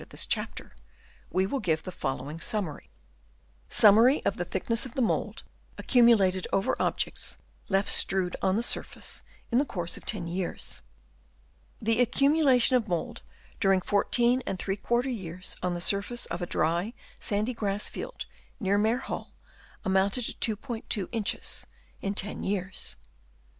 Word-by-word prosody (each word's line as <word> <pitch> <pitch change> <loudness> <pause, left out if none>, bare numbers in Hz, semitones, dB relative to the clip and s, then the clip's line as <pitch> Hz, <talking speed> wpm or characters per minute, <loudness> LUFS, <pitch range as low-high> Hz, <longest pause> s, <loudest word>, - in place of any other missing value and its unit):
of - - -13
this - - -1
chapter), - - -3 0.6
we 185 +1 +1
will 270 +8 -2
give 160 -7 0
the 185 - -6
following 135 0 -4
summary: 185 -6 -2 0.5
— 60 - -34
Summary 225 +7 +7
of - - +1
the - - -3
thickness 230 0 0
of 260 -2 -6
the 265 - 0
Mould 225 - -1 0.3
accumulated 210 -7 +4
over 195 - +1
Objects - - -1 0.3
left 195 0 +2
strewed 185 -2 +2
on 190 0 +2
the 230 - +1
Surface, - - -2 0.3
in 240 - +4
the - - +3
course 175 - -3
of - - -13
ten 200 -6 -1
years. 175 +1 -4 1.0
The 225 +1 +2
accumulation 265 0 +4
of 235 -3 +1
mould 175 -3 -3 0.4
during 195 -2 +4
14f 235 +3 +1
years 185 -2 -5
on 180 -1 -1
the - - -3
surface 200 +6 0
of 170 +2 -5
a 175 - -2
dry, 175 +9 0 0.3
sandy, 215 +3 +1
grass 205 -2 -1
field - - -6 0.3
near 200 -2 +2
Maer 220 +3 +2
Hall, - - -6 0.5
amounted 195 +5 +2
to 220 -2 +1
2*2 220 -5 -2
inches 225 -3 -1 0.3
in 200 +1 -2
10 205 +1 -3
years. 190 -1 -1
205 Hz, 145 wpm, -28 LUFS, 185-235 Hz, 1.0 s, Summary